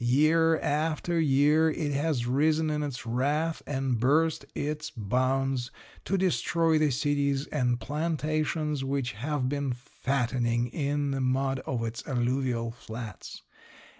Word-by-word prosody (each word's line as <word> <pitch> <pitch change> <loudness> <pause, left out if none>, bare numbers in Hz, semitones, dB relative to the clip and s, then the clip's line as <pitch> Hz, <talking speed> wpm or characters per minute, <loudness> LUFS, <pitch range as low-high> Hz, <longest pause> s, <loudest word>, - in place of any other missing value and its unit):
Year 155 +6 +4
after 160 +3 0
year 150 +2 +4
it 150 -1 -2
has 140 -3 0
risen 155 +5 +2
in 150 0 -1
its 140 -6 -4
wrath 145 +7 0
and 135 -4 -1
burst 150 +4 +2
its 150 +1 -3
bounds 130 +3 0 0.4
to 195 - +1
destroy 165 -3 +2
the 155 -1 +3
cities 140 +1 0
and 125 -4 0
plantations 155 +2 -1
which 135 -2 -1
have 130 +4 -2
been 140 -1 -1
fattening 120 -2 -1
in 145 +1 -1
the 135 -1 -1
mud 135 +1 +1
of 120 -3 -1
its 115 0 -4
alluvial 125 -2 0
flats. 115 -3 -8
140 Hz, 130 wpm, -28 LUFS, 125-155 Hz, 0.4 s, Year